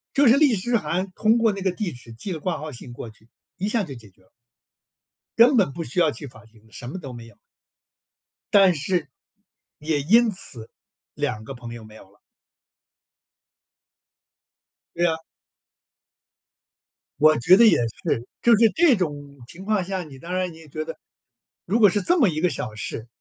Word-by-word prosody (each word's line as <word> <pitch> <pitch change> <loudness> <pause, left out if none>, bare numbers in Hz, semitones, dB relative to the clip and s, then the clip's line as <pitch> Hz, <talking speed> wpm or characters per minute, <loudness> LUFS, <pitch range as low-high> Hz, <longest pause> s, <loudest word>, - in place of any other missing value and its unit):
就 285 - +4
是 245 - +6
律师函 205 - +1
通 220 +4 +2
过 230 -2 +3
那 200 -1 -6
个 190 - +1
地 195 -2 -3
址 120 -2 -13
寄 150 - -6
了 165 - -4
挂 170 +1 -2
号 155 +1 -7
信 120 -1 -9
过 120 - -8
去， 110 0 -20 0.3
一 190 +2 -2
下 215 0 0
就 145 - -7
解 110 -4 -14
决 95 - -30
了。 95 - -29 1.1
根 245 +3 +6
本 195 -10 +3
不 165 - -5
需 130 +4 -2
要 165 -3 +4
去 145 - -7
法 120 -2 -16
庭 110 -1 -23
的， 110 - -24
什 120 +3 -7
么 160 - -6
都 145 -8 -8
没 120 -2 -10
有。 115 - -18 1.2
但 195 -3 +6
是， 165 +1 -1 0.7
也 150 -1 -1
因 225 +10 +4
此， 120 - -5 0.4
2 110 0 -3
个 125 - -8
朋 120 -2 -9
友 120 -1 -10
没 110 0 -15
有 95 - -15
了。 100 - -28 2.8
对 175 +1 +1
啊。 160 -2 +1 2.0
我 155 0 +5
觉 175 +10 +6
得 235 +4 +6
也 220 - +6
是， 115 +1 -3
就 235 -2 +5
是 225 0 +5
这 325 -6 +5
种 145 -5 -4
情 185 +8 -11
况 210 -2 0
下， 190 0 -4
你 140 -5 -13
当 170 +6 -7
然 185 -1 -1
你 160 - -14
也 160 -1 -15
觉 155 +2 -5
得， - - -9 0.7
如 210 +6 +1
果 210 -3 +7
是 205 +3 0
这 350 - +2
么 245 - +4
一 155 -2 -3
个 180 +2 +2
小 110 - -4
事， 110 +1 -5
165 Hz, 205 characters per minute, -23 LUFS, 120-200 Hz, 2.8 s, 果